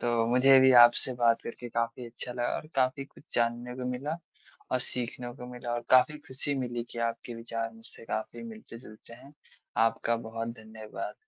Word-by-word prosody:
तो 120 Hz, -1 st, +1 dB
मुझे 130 Hz, +3 st, +6 dB
भी 130 Hz, 0 st, +7 dB
आपसे 120 Hz, +2 st, +4 dB
बात 115 Hz, -1 st, +3 dB
करके 120 Hz, +1 st, -6 dB
काफ़ी 115 Hz, +1 st, -2 dB
अच्छा 125 Hz, +1 st, -6 dB
लगा 120 Hz, 0 st, -1 dB
और -, -, -7 dB
काफ़ी 130 Hz, +1 st, +1 dB
कुछ -, -, -19 dB
जानने 120 Hz, +1 st, 0 dB
को 130 Hz, -, -4 dB
मिला 140 Hz, +5 st, -3 dB, 0.6 s
और 130 Hz, -, +3 dB
सीखने 125 Hz, -1 st, -4 dB
को 125 Hz, -, -8 dB
मिला 120 Hz, -1 st, -5 dB
और 120 Hz, -, -1 dB
काफ़ी 130 Hz, +4 st, +5 dB
ख़ुशी 135 Hz, +2 st, -2 dB
मिली 120 Hz, -2 st, -3 dB
कि -, -, -8 dB
आपके 115 Hz, +1 st, -7 dB
विचार 115 Hz, 0 st, -4 dB
मुझसे 115 Hz, 0 st, -12 dB
काफ़ी 110 Hz, -, -4 dB
मिलते-जुलते 115 Hz, -, -12 dB
हैं। 130 Hz, +4 st, -15 dB, 0.5 s
आपका 115 Hz, +1 st, 0 dB
बहुत 115 Hz, 0 st, -4 dB
धन्यवाद। 110 Hz, -1 st, -7 dB
120 Hz, 175 wpm, -29 LUFS, 115-130 Hz, 0.6 s, भी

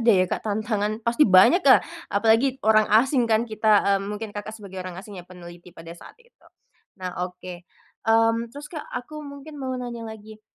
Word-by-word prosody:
ada 235 Hz, -, 0 dB
ya 185 Hz, -5 st, +5 dB
Kak -, -, -3 dB
tantangan 215 Hz, 0 st, -2 dB
pasti 235 Hz, +1 st, +3 dB
banyak 190 Hz, -, +6 dB
ya, -, -, +6 dB, 0.2 s
apalagi 225 Hz, +6 st, +2 dB
orang 215 Hz, -1 st, +4 dB
asing 240 Hz, +2 st, +3 dB
kan 220 Hz, +1 st, +2 dB
kita, 220 Hz, -1 st, -3 dB, 0.2 s
eee, 200 Hz, -1 st, +2 dB
mungkin 210 Hz, 0 st, -6 dB
Kakak 215 Hz, +1 st, -7 dB
sebagai 195 Hz, -3 st, -9 dB
orang 180 Hz, -1 st, -7 dB
asing 195 Hz, -1 st, -9 dB
ya -, -, -16 dB
peneliti 175 Hz, -1 st, -13 dB
pada 165 Hz, -1 st, -11 dB
saat 170 Hz, -, -14 dB
itu. 475 Hz, 0 st, -29 dB, 0.6 s
Nah 185 Hz, -2 st, -6 dB, 0.2 s
oke, 180 Hz, 0 st, -10 dB, 0.5 s
mmm, 225 Hz, +1 st, +3 dB
terus 285 Hz, +4 st, -10 dB
Kak 305 Hz, -3 st, -7 dB
aku 300 Hz, +5 st, -7 dB
mungkin 285 Hz, 0 st, -10 dB
mau 260 Hz, -1 st, -3 dB
nanya 240 Hz, -2 st, -6 dB
lagi. 220 Hz, 0 st, -11 dB
220 Hz, 190 wpm, -24 LUFS, 195-245 Hz, 0.6 s, banyak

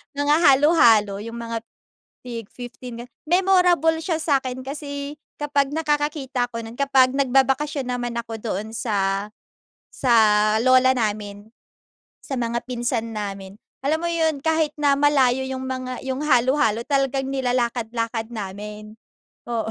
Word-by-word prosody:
Mga 290 Hz, +1 st, +2 dB
halo-halo, 265 Hz, -, +5 dB
yung 230 Hz, +2 st, -7 dB
mga 230 Hz, 0 st, -4 dB, 0.6 s
tig-15. 240 Hz, +1 st, -8 dB, 0.2 s
Memorable 355 Hz, -2 st, +3 dB
siya 320 Hz, 0 st, -2 dB
sakin 260 Hz, -4 st, -1 dB
kasi 285 Hz, +1 st, -6 dB, 0.2 s
kapag 285 Hz, -1 st, +1 dB
nakakakita 295 Hz, -5 st, -1 dB
ako 230 Hz, -1 st, -6 dB
nun 225 Hz, +2 st, -10 dB
kapag 265 Hz, -2 st, +4 dB
nagbabakasyon 270 Hz, +1 st, +1 dB
naman 245 Hz, -1 st, -3 dB
ako 235 Hz, -1 st, -4 dB
doon 215 Hz, -1 st, -4 dB
sa 200 Hz, -3 st, -1 dB, 0.6 s
sa 250 Hz, -3 st, +1 dB, 0.5 s
lola 255 Hz, 0 st, +5 dB
namin. 210 Hz, -2 st, -3 dB, 0.7 s
Sa 270 Hz, -, -4 dB
mga 235 Hz, 0 st, -1 dB
pinsan 240 Hz, -2 st, -2 dB
namin, 195 Hz, -2 st, -6 dB, 0.3 s
alam 310 Hz, +4 st, 0 dB
mo 340 Hz, -, 0 dB
yun, 320 Hz, -3 st, 0 dB
kahit 320 Hz, -2 st, +1 dB
na 285 Hz, -1 st, +3 dB
malayo 265 Hz, -3 st, +3 dB
yung 260 Hz, 0 st, -4 dB
mga 255 Hz, -1 st, -5 dB
yung 260 Hz, 0 st, -2 dB
halo-halo, 255 Hz, -4 st, +2 dB
talagang 270 Hz, -1 st, 0 dB
nilalakad-lakad 235 Hz, -3 st, -1 dB
namin. 210 Hz, +1 st, -7 dB, 0.5 s
Oo. 230 Hz, -2 st, -2 dB
255 Hz, 120 wpm, -22 LUFS, 230-285 Hz, 0.7 s, halo-halo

